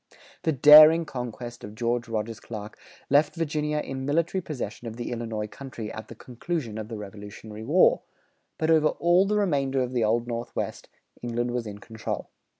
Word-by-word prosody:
The 160 - +1
daring 155 +4 +8
conquest 120 -3 -7
of 105 +1 -9
George 120 +1 -1
Rogers 115 0 -3
Clark 105 -2 -8 0.4
left 145 +4 +4
Virginia 150 -2 -1
in 135 -3 -4
military 165 +6 0
possession 135 -6 -6
of 110 - -6
the 120 0 -5
Illinois 115 -3 -3
country 115 -1 -8
at 110 - -8
the 115 - -10
conclusion 125 -1 -5
of 110 - -6
the 115 -1 -6
Revolutionary 105 +1 -9
War; 155 +10 +4 0.6
but 160 +1 +1
over 155 -1 +5
all 175 +5 +3
the 210 +1 +1
remainder 140 -9 +1
of 125 0 -5
the 120 -2 +1
Old 115 +2 +1
Northwest, 120 0 -5 0.3
England 120 0 -2
was 120 -2 -3
in 105 -1 -7
control. 110 +1 -6
120 Hz, 170 wpm, -26 LUFS, 110-150 Hz, 0.6 s, daring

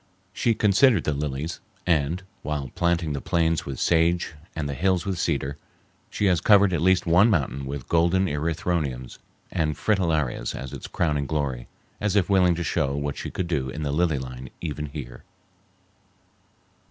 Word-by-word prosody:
She 115 - +1
considered 105 0 +4
the 75 - 0
lilies, 75 +2 -3 0.3
and, 85 +1 +1 0.2
while 75 -4 -3
planting 85 -3 0
the 70 - -3
plains 80 -1 0
with 65 -3 -5
sage 85 0 +2 0.2
and 80 -2 -2
the 70 - -3
hills 90 +5 +1
with 95 -3 -2
cedar, 70 -4 -1 0.5
she 105 - -1
has 90 -5 +3
covered 100 -3 +5
at 85 - 0
least 95 +1 +3
one 90 +6 +5
mountain 70 - 0
with 70 -2 -5
golden 85 +3 +3
erythroniums 75 -5 -2 0.3
and 75 -2 0
fritillarias 80 - 0
as 65 -2 -7
its - - -7
crowning 75 -4 0
glory, 70 -6 -2 0.3
as 105 -1 0
if 100 -1 +2
willing 90 -3 +4
to 85 - -3
show 70 -3 0
what 70 -1 -2
she - - -5
could 90 - -3
do 70 -6 -1
in 75 +3 -5
the 70 - -1
lily 80 0 +1
line 65 -1 -7
even 75 -2 -4
here. 70 -4 -8
80 Hz, 165 wpm, -25 LUFS, 70-90 Hz, 0.5 s, covered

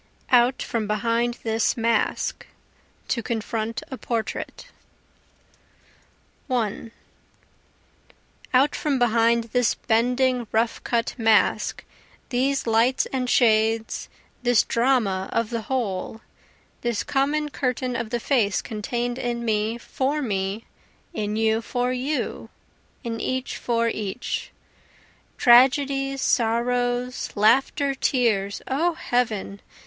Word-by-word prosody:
Out 245 +1 +4
from 225 -3 -2
Behind 230 +3 0
This 225 +1 +1
Mask 230 0 0 0.6
[To 235 - 0
Confront 225 0 -3
a 265 - -6
Portrait] 230 -2 -4 1.8
1 230 -3 -2 1.6
Out 270 +3 +4
from 290 -3 0
behind 235 -1 +3
this 245 -2 +2
bending 245 +1 +1
rough 225 +1 0
cut 235 -1 0
mask, 225 -1 +2 0.5
These 270 +2 0
lights 230 +3 +3
and 255 -2 -1
shades, 225 -1 +2 0.3
this 245 -2 +4
drama 230 -6 +1
of 230 0 -1
the 230 -1 -2
whole, 225 -4 -2 0.6
This 240 -3 -1
common 295 +2 0
curtain 255 -2 -2
of 230 -2 -3
the 240 0 -1
face 225 -5 +1
contain'd 240 +3 -3
in 235 -1 -2
me 220 +1 0
for 270 +4 -2
me, 200 -1 -2 0.5
in 210 -7 -2
you 220 0 +2
for 245 +2 -1
you, 270 +4 -3 0.5
in 230 -2 -4
each 260 0 -2
for 230 -1 0
each, 215 +1 -3 0.9
(Tragedies, 275 +2 +4
sorrows, 245 +1 0
laughter, 270 +6 +3
tears 225 -7 0
0 325 +6 +1
heaven! 220 -8 -2
235 Hz, 105 wpm, -24 LUFS, 225-255 Hz, 1.8 s, Out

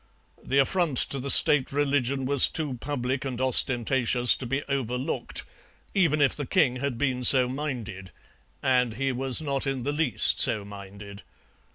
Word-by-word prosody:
The 135 - -1
affront 155 0 +1
to 140 - -1
the 140 +2 -5
State 140 0 +3
religion 140 -2 -1
was 140 0 +5
too 150 -5 -5
public 130 -2 -3
and 130 -3 -5
ostentatious 125 -1 +2
to 125 - -6
be 135 +4 -2
overlooked, 130 -2 -4 0.5
even 160 -6 +1
if 140 - +1
the 145 -3 -6
king 145 -10 +1
had 135 -2 -4
been 130 -1 -2
so 130 0 +5
minded, 120 -9 -6 0.5
and 125 -3 +1
he 135 +2 -1
was 130 +3 -1
not 140 -1 -3
in 135 -2 -3
the 145 +3 -2
least 160 +2 +2
so 110 -6 +2
minded. 100 0 -11
130 Hz, 160 wpm, -25 LUFS, 125-140 Hz, 0.5 s, was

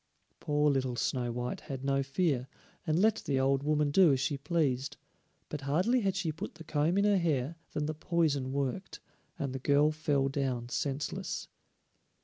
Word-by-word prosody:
Poor 150 0 +2
little 130 -2 0
Snow 120 +1 -1
white 125 +1 -3
had 135 -1 -6
no 135 0 +2
fear, 135 -2 0 0.4
and 155 0 +2
let 220 +2 +4
the 135 -2 -1
old 135 0 +2
woman 150 0 +1
do 180 0 +6
as 135 - +2
she 145 +2 0
pleased, 140 -3 -1 0.5
but 150 - -5
hardly 180 - +2
had 195 -2 0
she 185 -5 -1
put 155 - -7
the 165 - -10
comb 155 +4 +1
in 200 - +3
her 205 -2 +4
hair 155 -3 0 0.2
than 150 - -1
the 155 - -2
poison 150 -5 0
worked, 140 +7 -3 0.4
and 140 -2 -3
the 135 - -3
girl 145 +3 +3
fell 145 -3 +1
down 130 -4 -2
senseless. 140 +2 -3
145 Hz, 175 wpm, -31 LUFS, 135-160 Hz, 0.5 s, do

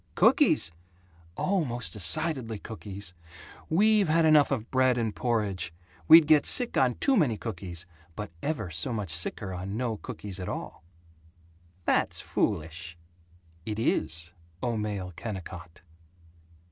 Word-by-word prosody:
"Cookies? 80 - +4 0.7
Oh, 190 -2 +1
most 120 -4 -1
decidedly 120 - +2
cookies. 100 -4 -8 0.6
We've 210 +3 +4
had 160 +1 +3
enough 155 -2 +5
of 125 -4 -3
bread 130 -1 +3
and 115 -3 -2
porridge. 105 -9 -1 0.4
We'd 165 - +9
get 150 -1 +5
sick 245 -1 +1
on 125 -2 +3
too 275 - +2
many 140 - +2
cookies, 90 -6 -7 0.3
but 105 -3 -6
ever 125 - -3
so 80 - -2
much 100 -8 -3
sicker 95 +3 -2
on 95 +3 -5
no 115 -3 -2
cookies 100 -2 -6
at 90 - -5
all." - - -6 1.0
"That's - - +2
foolish." 85 +2 -2 0.7
"It 105 +1 -4
is, 85 -6 -1 0.3
O 120 -2 0
male 100 -4 -4
Kennicott!" 90 -5 -8
110 Hz, 130 wpm, -28 LUFS, 90-135 Hz, 1.0 s, We'd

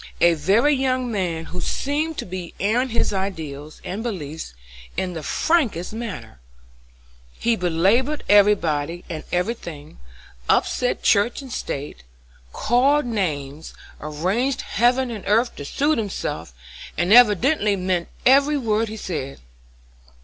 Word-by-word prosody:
"A 170 0 +5
very 200 - +3
young 255 -2 0
man 175 -6 -2
who 180 +2 -6
seemed 300 - -1
to - - -3
be 180 -2 -7
airing 235 +6 +1
his 230 -2 0
ideas 155 -7 -5
and 195 +4 -4
beliefs 160 - -5 0.4
in 185 -1 -1
the 160 - -5
frankest 220 - 0
manner. 200 - -7 1.0
He 235 0 +1
belabored 200 - +1
everybody 175 -6 +3
and 155 -2 -5
every 180 +6 +1
thing, 155 -9 -10 0.5
upset 250 - +1
church 220 +6 +2
and 260 -3 -8
state, 140 - -5 0.5
called 270 - +2
names, 155 - -3 0.2
arranged 185 - -1
heaven 245 +3 +1
and 215 -4 -6
earth 225 +4 +2
to 145 - -6
suit 290 - +1
himself, 135 - -4 0.5
and 175 +5 +3
evidently 225 - +5
meant 180 -2 -1 0.2
every 280 +3 +5
word 225 -3 0
he 220 - -6
said. 145 -9 -5
200 Hz, 125 wpm, -22 LUFS, 165-245 Hz, 1.0 s, A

